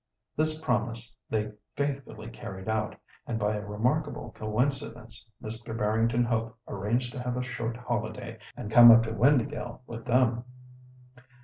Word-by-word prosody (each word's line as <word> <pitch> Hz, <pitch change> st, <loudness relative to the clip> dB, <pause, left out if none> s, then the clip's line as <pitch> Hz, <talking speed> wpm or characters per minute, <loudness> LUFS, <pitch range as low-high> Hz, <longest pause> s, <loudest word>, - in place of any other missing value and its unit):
This 155 Hz, 0 st, +1 dB
promise 120 Hz, -5 st, -1 dB
they 105 Hz, -1 st, -1 dB, 0.2 s
faithfully 135 Hz, -6 st, -3 dB
carried 95 Hz, -4 st, -8 dB
out, 110 Hz, -1 st, 0 dB, 0.3 s
and 115 Hz, -, -1 dB
by 105 Hz, 0 st, +1 dB
a 105 Hz, -, -4 dB
remarkable 125 Hz, +9 st, -1 dB
coincidence, 115 Hz, -1 st, -3 dB
Mr. 115 Hz, +1 st, -4 dB
Barrington 115 Hz, +3 st, +2 dB
Hope 115 Hz, -1 st, -1 dB
arranged 115 Hz, +5 st, -1 dB
to 130 Hz, -, -5 dB
have 125 Hz, 0 st, -2 dB
a 125 Hz, -, -1 dB
short 115 Hz, -2 st, -3 dB
holiday, 120 Hz, -1 st, -4 dB, 0.2 s
and 105 Hz, -, -6 dB
come 120 Hz, 0 st, +10 dB
up 115 Hz, 0 st, +9 dB
to 110 Hz, -, -3 dB
Windāhgil 120 Hz, 0 st, +2 dB
with 115 Hz, -1 st, -8 dB
them. 120 Hz, -1 st, +3 dB
115 Hz, 140 wpm, -29 LUFS, 110-125 Hz, 0.3 s, come